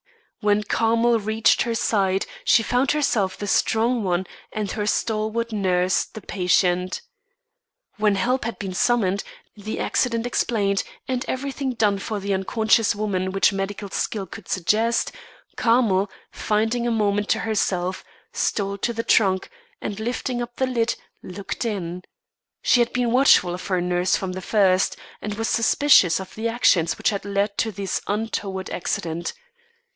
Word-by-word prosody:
When 210 -1 +2
Carmel 230 +3 +2
reached 220 +1 +2
her 235 -1 0
side, 195 -4 +1 0.2
she 225 - +4
found 250 +4 +1
herself 220 -11 +1
the 205 - -5
strong 225 +3 +1
one 185 0 0 0.3
and 210 -2 -3
her 210 -2 -2
stalwart 220 +2 -1
nurse 185 -3 +1
the 220 - -11
patient. 180 - +1 1.0
When 210 -1 +2
help 245 +6 0
had 230 - -4
been 195 -2 -5
summoned, 200 -2 +1 0.3
the 215 +1 -5
accident 230 -2 0
explained, 205 -5 0 0.3
and 255 -1 -1
everything 270 0 -3
done 210 -4 +1
for 210 +1 -4
the 200 0 -2
unconscious 220 +3 +2
woman 190 -3 -1
which 195 +1 +3
medical 195 0 -4
skill 205 -3 -2
could 195 0 -11
suggest, 220 +6 +1 0.4
Carmel, 220 -5 +2 0.2
finding 225 +3 0
a - - +1
moment 205 -2 0
to - - +2
herself, 185 -4 -1 0.3
stole 200 -1 -1
to 235 - -1
the 230 0 -3
trunk, 190 - +2 0.3
and, 205 0 -5
lifting 240 +2 -2
up 240 0 -6
the 260 - +1
lid, 240 -2 0 0.3
looked 195 +5 -6
in. 180 -6 -3 0.6
She 245 - +4
had 240 0 +2
been 245 -2 0
watchful 245 -8 +5
of 180 +1 -6
her 185 -2 +1
nurse 180 +1 +1
from 190 -1 -3
the 185 +1 -5
first, 190 -2 +2 0.2
and 210 0 -4
was 225 +1 -2
suspicious 230 - +4
of 190 0 -8
the 220 +1 -2
actions 190 -8 +2
which - - +1
had 200 - -3
led 200 +1 -1
to 225 - +1
this 195 -1 -3
untoward 200 -3 -3
accident. 170 -1 -3
210 Hz, 155 wpm, -23 LUFS, 190-230 Hz, 1.0 s, watchful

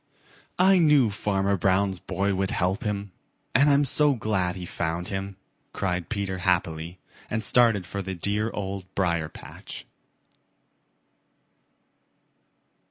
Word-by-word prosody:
"I 190 +1 +5
knew 150 -8 +4
Farmer 100 -1 0
Brown's 95 +1 +1
boy 100 +5 -1
would 95 0 -1
help 95 +3 -1
him, 100 -1 -3 0.4
and 140 +3 +5
I'm 145 0 +4
so 145 +1 +3
glad 100 -5 -1
he 90 -1 -6
found 85 +1 -3
him," 95 0 -4 0.4
cried 90 -3 -2
Peter 100 -4 -3
happily 85 -2 -1 0.3
and 110 0 -1
started 115 -4 +4
for 100 +2 -5
the 95 0 -5
dear 105 +5 0
Old 100 -3 -5
Briar 85 -5 0
patch. - - -10
100 Hz, 120 wpm, -26 LUFS, 90-105 Hz, 0.4 s, I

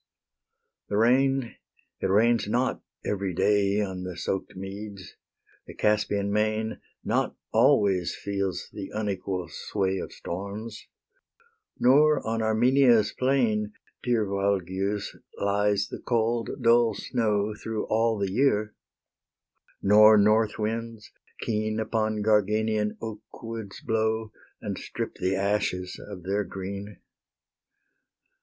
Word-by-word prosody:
The 105 - 0
rain, 130 +2 +2 0.4
it - - 0
rains 110 +3 +3
not 125 +4 0 0.2
every 95 -3 -2
day 100 +1 +2
On 95 -3 -3
the 90 -1 -6
soak'd 95 +2 -3
meads; 100 0 -8 0.5
the - - -10
Caspian 105 -1 +1
main 110 +1 0 0.2
Not - - 0 0.2
always 95 -4 +3
feels 100 -2 -3
the 95 - -6
unequal 95 -4 -2
sway 95 +3 -2
Of - - -6
storms, 100 +5 -6 0.9
nor 150 +4 +4
on 115 0 -1
Armenia's 115 0 +4
plain, 115 -6 +1 0.3
Dear 120 -3 +1
Valgius, 100 0 -1 0.2
lies 100 0 +1
the - - -7
cold 115 0 0
dull 115 -2 +4
snow 105 -2 0
Through 110 0 -4
all 115 0 +1
the 100 -2 -1
year; 105 -3 +2 1.1
nor 105 +2 +7
northwinds 110 +1 +1 0.3
keen 110 0 -1
Upon 110 -1 -1
Garganian 105 0 +1
oakwoods 110 -1 -7
blow, 110 -1 0 0.3
And - - -4
strip - - -5
the 95 +1 +1
ashes 95 -2 -1
of 95 -4 -8
their 100 +3 0
green. 100 +2 -7
105 Hz, 110 wpm, -27 LUFS, 100-110 Hz, 1.1 s, nor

